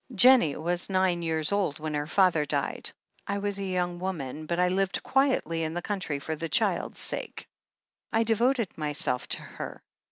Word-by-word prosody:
' -, -, -10 dB
"Jennie 250 Hz, -, +7 dB
was 175 Hz, +3 st, -2 dB
nine 185 Hz, -2 st, +2 dB
years 160 Hz, -1 st, 0 dB
old 195 Hz, -7 st, +1 dB
when 155 Hz, 0 st, -4 dB
her 145 Hz, 0 st, -1 dB
father 180 Hz, -3 st, +4 dB
died. 145 Hz, -, -2 dB, 0.4 s
I 200 Hz, -, -1 dB
was 200 Hz, 0 st, -2 dB
a -, -, -2 dB
young 180 Hz, -2 st, -1 dB
woman, 155 Hz, -5 st, -4 dB
but 170 Hz, +1 st, -1 dB
I 180 Hz, -, +4 dB
lived 195 Hz, +1 st, 0 dB
quietly 265 Hz, -, +2 dB
in 160 Hz, 0 st, -2 dB
the 175 Hz, -, -1 dB
country 190 Hz, -8 st, -2 dB
for 155 Hz, +3 st, -4 dB
the 165 Hz, +1 st, -4 dB
child's -, -, +1 dB
sake. -, -, -4 dB, 0.7 s
I 225 Hz, +1 st, +3 dB
devoted 230 Hz, -2 st, +1 dB
myself 150 Hz, -4 st, -1 dB
to -, -, -1 dB
her. -, -, -7 dB
175 Hz, 185 wpm, -28 LUFS, 155-200 Hz, 0.7 s, Jennie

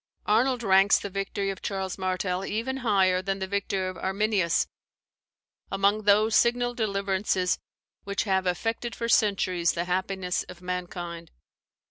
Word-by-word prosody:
] -, -, -44 dB
Arnold 250 Hz, +1 st, +2 dB
ranks 195 Hz, -1 st, +5 dB
the 200 Hz, -, -5 dB
victory 195 Hz, 0 st, -2 dB
of 190 Hz, -, -8 dB
Charles 190 Hz, -2 st, -3 dB
Martel 185 Hz, 0 st, -1 dB
even 230 Hz, +7 st, -2 dB
higher 195 Hz, -7 st, +2 dB
than 195 Hz, +1 st, -2 dB
the 190 Hz, -, -3 dB
victory 195 Hz, -1 st, -1 dB
of 185 Hz, 0 st, -6 dB
Arminius, 190 Hz, -3 st, +1 dB, 1.1 s
"among 200 Hz, +2 st, +1 dB
those 215 Hz, +2 st, +4 dB
signal 245 Hz, 0 st, +3 dB
deliverances 195 Hz, -4 st, 0 dB, 0.4 s
which 200 Hz, 0 st, -1 dB
have 190 Hz, -3 st, 0 dB
affected 225 Hz, +6 st, -2 dB
for 230 Hz, -, -3 dB
centuries 190 Hz, -6 st, +2 dB
the 170 Hz, 0 st, -2 dB
happiness 185 Hz, 0 st, -1 dB
of 180 Hz, -1 st, -10 dB
mankind." 175 Hz, -2 st, -5 dB
195 Hz, 140 wpm, -27 LUFS, 185-210 Hz, 1.1 s, ranks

